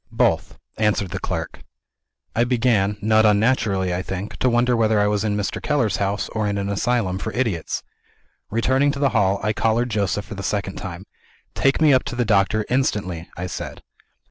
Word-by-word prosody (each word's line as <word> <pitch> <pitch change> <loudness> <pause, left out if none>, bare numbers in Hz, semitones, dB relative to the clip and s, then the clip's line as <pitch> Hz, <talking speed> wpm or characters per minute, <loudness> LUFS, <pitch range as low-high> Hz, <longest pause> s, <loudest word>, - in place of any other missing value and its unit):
"Both," - - +1 0.2
answered 105 -4 +1
the - - -3
clerk. - - -4 0.7
I 115 - +3
began 115 -5 +1
not 110 0 +4
unnaturally, 105 -3 +2
I 90 - -1
think 95 +2 -5
to 130 - +2
wonder 120 +1 +2
whether 110 -2 +2
I 105 - +3
was 105 0 +1
in 105 -1 0
Mr. 105 - -3
Keller's 120 -10 +1
house, 100 0 -1
or 110 -2 -1
in 100 0 -1
an 100 0 -2
asylum 100 -2 0
for - - -4
idiots. 110 -10 -2 0.7
Returning 130 +6 +2
to - - -6
the 140 -1 +3
hall, 100 -4 +2
I 105 0 +1
collared 115 +3 +1
Joseph 105 -1 -1
for - - -8
the 100 - -6
second 100 0 -2
time. 95 -1 -7 0.5
"Take 135 0 +2
me 155 -3 +5
up 130 - +4
to - - -4
the 120 -1 0
doctor 110 0 +2
instantly!" 100 -10 -1
I 90 - -3
said. 90 - -6
105 Hz, 190 wpm, -22 LUFS, 100-120 Hz, 0.7 s, me